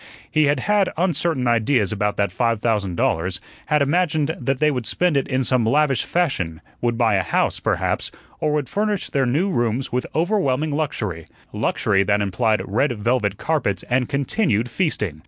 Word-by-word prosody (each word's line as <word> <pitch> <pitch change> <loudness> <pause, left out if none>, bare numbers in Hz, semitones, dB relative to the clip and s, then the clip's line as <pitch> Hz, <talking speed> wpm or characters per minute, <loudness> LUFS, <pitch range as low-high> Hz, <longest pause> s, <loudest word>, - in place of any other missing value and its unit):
He 155 -1 +3
had 140 -2 +1
had 205 +1 +2
uncertain 165 -6 0
ideas 115 -2 +2
about 105 -1 -1
that 100 -2 +1
five 115 +3 0
thousand 105 -6 0
dollars; 85 +3 0 0.3
had 150 -1 +3
imagined 155 0 +1
that 135 +1 -1
they 150 +2 +3
would 125 -5 -2
spend 175 +5 +1
it 140 - +1
in 130 -1 0
some 130 -1 +1
lavish 135 +2 +2
fashion; 95 - -1 0.2
would 120 -1 0
buy 115 -3 +3
a - - +2
house, - - 0
perhaps, - - -1 0.3
or 155 - 0
would 150 -3 -1
furnish 205 - -2
their 135 -2 +1
new 165 +11 +1
rooms 120 -2 -1
with 125 +1 -1
overwhelming 155 -5 +1
luxury 105 - -3 0.3
luxury 95 -2 +1
that 100 +1 +2
implied 105 +2 0
red 120 +8 +1
velvet 105 -2 0
carpets 120 - -1
and 125 0 +1
continued 140 - 0
feasting. 110 - -1
130 Hz, 175 wpm, -21 LUFS, 105-150 Hz, 0.3 s, He